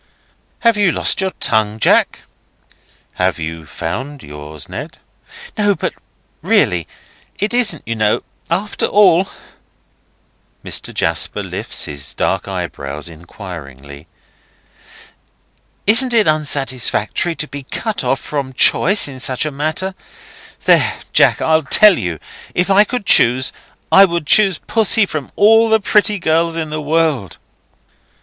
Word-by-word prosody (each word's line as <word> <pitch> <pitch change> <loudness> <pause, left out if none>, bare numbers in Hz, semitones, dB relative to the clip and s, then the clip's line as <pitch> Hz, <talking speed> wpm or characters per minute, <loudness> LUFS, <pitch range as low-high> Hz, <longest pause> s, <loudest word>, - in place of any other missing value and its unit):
"Have 230 -2 +3
you 200 -4 +2
lost - - -1
your 190 - 0
tongue, 110 -1 +1
Jack?" - - +1 1.0
"Have 90 -4 +1
you 80 0 -7
found 130 - -6
yours, 75 +1 -9
Ned?" - - -8 0.6
"No, 205 -1 +2
but - - -4 0.5
really;—isn't 200 - -1
it, - - -42
you 115 - -2
know, 110 -1 0 0.3
after 195 +5 -2
all—" 195 -2 +3 1.4
Mr. - - -1
Jasper - - 0
lifts - - -3
his 70 -2 -5
dark - - -1
eyebrows 70 +3 -6
inquiringly. 80 -4 -11 1.8
"Isn't 240 +4 +3
it 220 -2 +3
unsatisfactory 145 0 0
to 150 - -5
be 145 -1 -8
cut 210 - -4
off 130 +2 0
from 140 -3 -5
choice 195 +9 +4
in 135 -2 -9
such 130 +2 +1
a 155 - -3
matter? 155 +7 -2 0.7
There, - - +3 0.2
Jack! - - +3
I 160 0 +2
tell 210 -4 +6
you! 85 -3 -4 0.4
If 180 +2 0
I 205 +2 +5
could 245 -2 -5
choose, 130 -6 +4 0.4
I 195 - +8
would 170 -3 -3
choose 195 +1 +4
Pussy 225 -1 +2
from 155 -7 -6
all 225 +2 +4
the 220 0 +3
pretty 210 0 +2
girls 165 -1 0
in 160 -2 -4
the 155 0 -4
world." 150 - -1
155 Hz, 130 wpm, -16 LUFS, -, 1.8 s, I